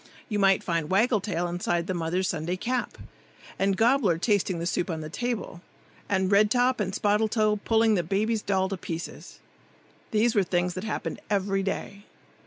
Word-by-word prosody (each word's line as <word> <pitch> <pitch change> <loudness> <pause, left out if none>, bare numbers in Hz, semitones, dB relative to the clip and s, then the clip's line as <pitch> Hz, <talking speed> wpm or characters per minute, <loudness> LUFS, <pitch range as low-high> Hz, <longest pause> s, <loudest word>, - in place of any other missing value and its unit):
You 210 -2 -1
might 195 -1 +4
find 165 -3 -1
Waggle 215 +2 +3
tail 175 -4 -2
inside 175 -1 -1
the 185 - -2
mother's 175 +2 -1
Sunday 175 +2 -2
cap, 245 +5 -2 0.6
and 195 0 +1
Gobbler 225 -6 +3
tasting 195 -1 +1
the 170 - -3
soup 175 +1 -1
on 160 -2 -3
the 155 0 -7
table, 235 -6 -4 0.5
and 190 -1 +1
Red 205 +1 +5
top 250 +2 +2
and 195 -3 -1
Spottle 210 +2 +1
toe 215 -1 +2
pulling 225 -1 +3
the 190 - +2
baby's 210 +6 0
doll 190 -2 +1
to 195 - -3
pieces. 165 -1 -7 0.7
These 225 +1 +2
were 205 - +4
things 175 0 0
that 185 +4 -5
happened 220 - -4
every 195 -1 +1
day. 200 +1 -4
195 Hz, 180 wpm, -26 LUFS, 175-215 Hz, 0.7 s, Red